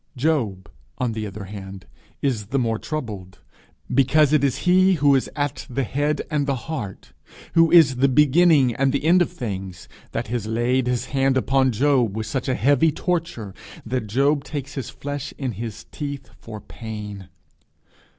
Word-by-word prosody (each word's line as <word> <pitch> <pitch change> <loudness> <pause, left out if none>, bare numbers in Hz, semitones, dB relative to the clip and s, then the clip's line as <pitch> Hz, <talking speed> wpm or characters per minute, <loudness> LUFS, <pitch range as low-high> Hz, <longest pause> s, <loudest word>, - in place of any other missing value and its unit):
Job, 120 -10 0 0.3
on 125 -2 -1
the 110 -1 -4
other 100 +1 -8
hand, 95 -1 -9 0.4
is 115 -8 -1
the 135 - -1
more 115 -4 0
troubled 105 -12 -6 0.6
because 140 +3 +4
it 150 -2 +3
is 135 -3 +1
He 185 +1 +5
who 145 -4 +4
is 135 - +1
at 145 -2 -3
the 130 +2 -1
head 145 +5 -1
and 150 -2 0
the 140 - +1
heart, 120 - -6 0.4
who 165 0 +5
is 155 -7 +6
the 135 +2 +4
beginning 145 -1 +4
and 135 +3 +1
the 140 - -1
end 175 +3 +5
of 175 - +1
things, 95 - -6 0.2
that - - -3
has 115 -3 -2
laid 120 +3 +1
his 125 0 0
hand 135 -1 +2
upon 130 0 +2
him 125 -2 +2
with 110 +1 -3
such 120 +3 -3
a 130 - +1
heavy 145 +6 +3
torture 160 - -3 0.3
that 110 -3 -3
he 140 +5 +3
takes 140 0 -6
his 130 -3 -5
flesh 145 +1 -6
in 135 -3 -2
his 110 0 -7
teeth 140 -3 -6
for 110 -2 -9
pain. 105 -4 -8
130 Hz, 170 wpm, -23 LUFS, 110-145 Hz, 0.6 s, is